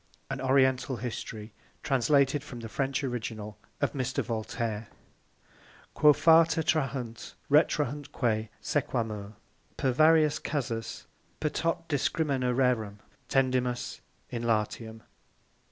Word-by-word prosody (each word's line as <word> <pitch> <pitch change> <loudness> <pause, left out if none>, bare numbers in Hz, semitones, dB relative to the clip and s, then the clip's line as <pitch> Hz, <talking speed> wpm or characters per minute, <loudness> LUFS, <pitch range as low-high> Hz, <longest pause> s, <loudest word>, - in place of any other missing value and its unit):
AN 130 - -3
Oriental 130 -1 +2
HISTORY, 110 -2 -6 0.3
Translated 140 +1 +2
from 125 -5 -9
the 115 - -6
French 135 +3 -1
ORIGINAL 110 -4 -4 0.3
OF - - +1
Mr. 130 -4 -1
VOLTAIRE. 110 -1 -3 1.1
_Quo 150 -1 +6
fata 160 +1 +5
trahunt, 135 -7 -2 0.2
retrahuntque 140 -7 +1
sequamur. 110 -8 -2 0.4
Per 130 - +1
varios 155 +2 +4
casus, 120 -6 -3 0.3
per 150 - 0
tot 165 +1 -2
discrimina 140 -3 0
rerum, 120 -5 +1 0.3
Tendimus 125 -2 0 0.3
in 120 - -3
Latium. 110 0 -1
130 Hz, 100 wpm, -29 LUFS, 115-145 Hz, 1.1 s, Quo